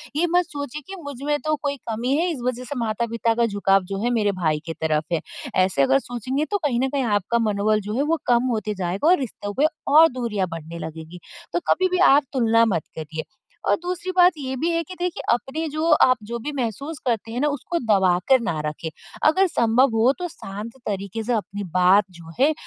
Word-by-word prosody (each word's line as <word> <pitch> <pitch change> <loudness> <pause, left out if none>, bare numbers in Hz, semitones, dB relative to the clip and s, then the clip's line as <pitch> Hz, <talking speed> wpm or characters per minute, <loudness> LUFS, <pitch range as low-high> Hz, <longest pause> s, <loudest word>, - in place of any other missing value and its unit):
ये 340 +4 +2
मत 355 0 +4
सोचिए 285 -1 -6
कि 385 -2 -8
मुझ 285 -1 -6
में 295 0 +1
तो 310 0 +2
कोई 285 -1 -1
कमी 240 +5 0
है 345 +3 +1
इस 300 - -5
वजह 250 0 -2
से 270 +3 -6
माता-पिता 230 0 0
का 235 +1 +2
झुकाव 195 -2 +2
जो 195 - -3
है 240 - +2
मेरे 205 -1 +2
भाई 155 -2 +2
की 165 - -4
तरफ 155 -1 0
है, 165 - +1 0.3
ऐसे 185 -5 +2
अगर 135 0 +4
सोचेंगे 255 - -3
तो 410 - +2
कहीं 285 -10 0
न 265 +1 +1
कहीं 275 0 -1
आपका 215 0 +1
मनोबल 210 +1 +1
जो - - -2
है 275 - +2
वो 330 - 0
कम 240 -1 +4
होते 215 -2 -2
जाएगा 185 - -1
और 360 +2 +6
रिश्तों 205 -5 -5
पे 295 - +5 0.3
और 320 +2 +9
दूरियाँ 210 -6 -1
बढ़ने 165 +1 -7
लगेगी। 160 +2 -10 0.3
तो - - +2
कभी 370 - +3
भी 365 - +2 0.2
आप 290 +1 +5
तुलना 230 -3 +4
मत 165 - -1
करिए। 155 0 -5 0.5
और - - +5
दूसरी 360 +1 -4
बात 360 0 +7
ये 265 -2 -4
भी 315 +6 -1
है 335 0 +1
कि 350 - -10
देखिए 350 -5 -2
अपने 280 +7 -3
जो 310 +2 -2 0.2
आप 255 - +5
जो 235 +3 -4
भी 290 +6 -4
महसूस 275 +5 -3
करते 225 -2 -1
हैं 240 - -3
ना 295 - +2
उसको 295 +4 -2
दबाकर 195 +2 +3
ना 170 -8 -2
रखें। 155 +2 -4 0.4
अगर 380 +4 +4
संभव 245 -3 +3
हो 225 +4 +4
तो 360 - -2
शांत 210 - -8
तरीके 200 +2 -3
से 245 +3 -1
अपनी 205 -2 -3
बात 185 +3 +5
जो 170 -2 -12
है 290 +4 +4
235 Hz, 220 wpm, -23 LUFS, 195-290 Hz, 0.5 s, और